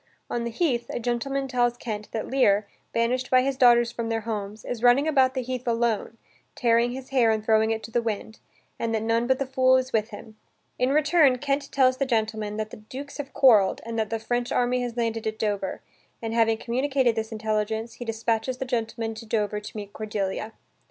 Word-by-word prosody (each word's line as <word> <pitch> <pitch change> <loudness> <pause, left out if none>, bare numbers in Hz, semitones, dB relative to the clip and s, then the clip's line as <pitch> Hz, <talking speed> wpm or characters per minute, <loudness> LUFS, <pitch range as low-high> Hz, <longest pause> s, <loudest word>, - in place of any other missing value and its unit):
On 235 -1 -1
the - - -2
heath, 240 -3 0
a - - -3
gentleman 260 +3 -1
tells 245 -2 +1
Kent 215 -3 -5
that 220 - -3
Lear, 210 -6 +3 0.3
banished 250 +2 0
by 255 0 +5
his 275 0 0
daughters 240 -2 +5
from 230 -1 -4
their 225 0 -1
homes, 210 -1 -5
is 240 -2 -4
running 250 +5 +5
about 265 -4 +3
the 260 - -1
heath 250 0 -5
alone, 230 -1 0 0.4
tearing 235 0 +3
his 260 0 -8
hair 255 -4 +3
and 220 -1 0
throwing 220 0 +3
it 225 0 -2
to 225 - -9
the 240 - +1
wind, 220 -1 -4 0.4
and 225 -1 -1
that 220 - -1
none 230 +1 +1
but 260 0 +3
the 275 - -2
fool 260 0 +4
is 260 0 -2
with 220 0 +1
him. 215 0 -11 0.4
In 250 - +2
return 300 -2 +4
Kent 280 +2 -2
tells 260 -2 +3
the 275 - 0
gentleman 220 -3 -1
that 215 0 -3
the - - -9
dukes 265 +7 -9
have 285 -2 -6
quarrelled, 215 -8 +5
and 230 0 -3
that 215 -1 -1
the 225 - -1
French 240 +2 -2
army 250 0 +1
has 245 -1 -4
landed 225 -1 -1
at 220 0 -3
Dover, 205 -3 -2 0.4
and, 225 -1 -4
having 225 -1 +3
communicated 255 +1 +1
this 220 0 -3
intelligence, 220 +1 -2
he 245 - -8
dispatches 225 +2 -1
the 265 - -3
gentleman 230 -2 -2
to 220 +1 -10
Dover 210 -1 0
to 210 +1 -9
meet 205 -1 -7
Cordelia. 210 0 -3
230 Hz, 210 wpm, -25 LUFS, 220-255 Hz, 0.4 s, by